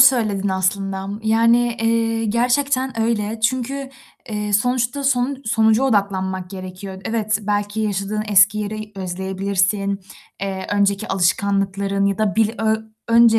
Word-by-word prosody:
söyledin 220 Hz, -7 st, +4 dB
aslında, 190 Hz, +1 st, -1 dB
yani, 230 Hz, +2 st, +3 dB
eee, 225 Hz, 0 st, +1 dB
gerçekten 250 Hz, +2 st, +1 dB
öyle. 225 Hz, -1 st, -1 dB
Çünkü, 260 Hz, +4 st, -1 dB, 0.4 s
eee, 210 Hz, -1 st, -3 dB
sonuçta 245 Hz, +5 st, +1 dB
sonu 265 Hz, 0 st, +2 dB
sonuca 220 Hz, +1 st, +3 dB
odaklanmak 190 Hz, -6 st, 0 dB
gerekiyor. 190 Hz, 0 st, -8 dB
Evet, 215 Hz, -1 st, 0 dB
belki 205 Hz, +1 st, -1 dB
yaşadığın 210 Hz, 0 st, -1 dB
eski 205 Hz, +1 st, +5 dB
yeri 215 Hz, 0 st, -5 dB
özleyebilirsin, 190 Hz, +2 st, -1 dB, 0.4 s
eee, 190 Hz, -1 st, -3 dB
önceki 200 Hz, -1 st, +1 dB
alışkanlıkların 195 Hz, +1 st, +1 dB
ya 200 Hz, 0 st, 0 dB
da 215 Hz, -1 st, 0 dB
bil 220 Hz, -1 st, +3 dB
ö 220 Hz, 0 st, +2 dB, 0.3 s
önce 230 Hz, -1 st, +6 dB
210 Hz, 120 wpm, -20 LUFS, 195-230 Hz, 0.4 s, önce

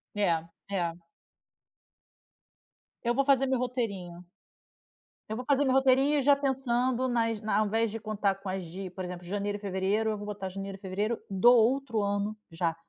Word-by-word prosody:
É, 165 Hz, -5 st, +1 dB, 0.2 s
é. 175 Hz, -3 st, -1 dB, 2.0 s
Eu 240 Hz, +1 st, +2 dB
vou 275 Hz, 0 st, +2 dB
fazer 270 Hz, -1 st, +4 dB
meu 260 Hz, -2 st, +1 dB
roteirinho. 200 Hz, -9 st, -3 dB, 1.0 s
Eu 220 Hz, -, -2 dB
vou 250 Hz, +1 st, -5 dB
fazer 285 Hz, 0 st, +3 dB
meu 260 Hz, -2 st, +2 dB
roteirinho 270 Hz, +2 st, +4 dB
já 285 Hz, 0 st, +6 dB
pensando 260 Hz, -2 st, 0 dB
nas 230 Hz, -3 st, 0 dB
na 215 Hz, -1 st, 0 dB
ao 215 Hz, -, +2 dB
invés 225 Hz, +1 st, +1 dB
de 225 Hz, -, -5 dB
contar 210 Hz, -2 st, 0 dB
com 195 Hz, -, -5 dB
as 185 Hz, -1 st, -3 dB
de, 185 Hz, +3 st, -7 dB
por 185 Hz, +1 st, -7 dB
exemplo, 180 Hz, 0 st, -7 dB
janeiro 205 Hz, +1 st, -2 dB
e -, -, -22 dB
fevereiro, 200 Hz, +3 st, 0 dB
eu 215 Hz, -, -1 dB
vou 205 Hz, -, -7 dB
botar 205 Hz, -2 st, -5 dB
janeiro 195 Hz, +1 st, -6 dB
e 195 Hz, -, -15 dB
fevereiro 205 Hz, +4 st, -2 dB
do 195 Hz, +5 st, +5 dB
outro 240 Hz, -1 st, +2 dB
ano 205 Hz, +1 st, -1 dB
já, 165 Hz, 0 st, -1 dB
215 Hz, 175 wpm, -29 LUFS, 195-250 Hz, 2.0 s, já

